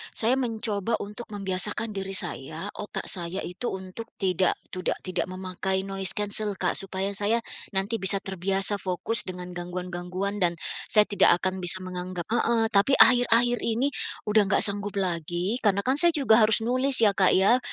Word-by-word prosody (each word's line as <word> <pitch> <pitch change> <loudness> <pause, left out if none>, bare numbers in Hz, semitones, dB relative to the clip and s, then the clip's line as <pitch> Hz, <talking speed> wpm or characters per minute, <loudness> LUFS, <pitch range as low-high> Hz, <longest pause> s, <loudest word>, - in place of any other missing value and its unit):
saya 235 +4 +2
mencoba 225 -3 -2
untuk 210 +4 -7
membiasakan 200 +3 0
diri 195 0 -3
saya, 170 +2 -4
otak 210 - -6
saya 175 +1 -3
itu, 185 +7 -5
untuk 190 +4 -6
tidak 185 -2 +1 0.2
tidak- 185 -1 -2
tidak 185 0 -2
memakai 190 +1 -3
noise 195 0 -2
cancel 210 0 +1
Kak - - -1
supaya 195 0 -3
saya 205 +3 0 0.4
nanti 200 +4 0
bisa 195 +1 +2
terbiasa 195 +2 0
fokus 190 +4 -1
dengan 180 -1 -7
gangguan-gangguan 180 +2 -5
dan 170 -1 +2 0.4
saya 210 -1 +6
tidak 200 -3 +4
akan 185 0 -1
bisa 180 +2 +1
menganggap 180 -1 -5
heeh, 235 -1 +1
tapi 205 +7 +3
akhir-akhir 245 -1 +5
ini, 245 +5 0 0.4
udah 215 -1 +5
nggak 195 - +3
sanggup 205 0 -2
lagi 175 - -2
karena 200 -1 +2
kan 260 +2 +1
saya 345 +1 +5
juga 245 -6 +4
harus 220 +1 +4
nulis 255 +1 +3
ya 210 - +6
Kak 190 -2 +4
ya, 205 +7 +4
195 Hz, 160 wpm, -25 LUFS, 185-220 Hz, 0.4 s, saya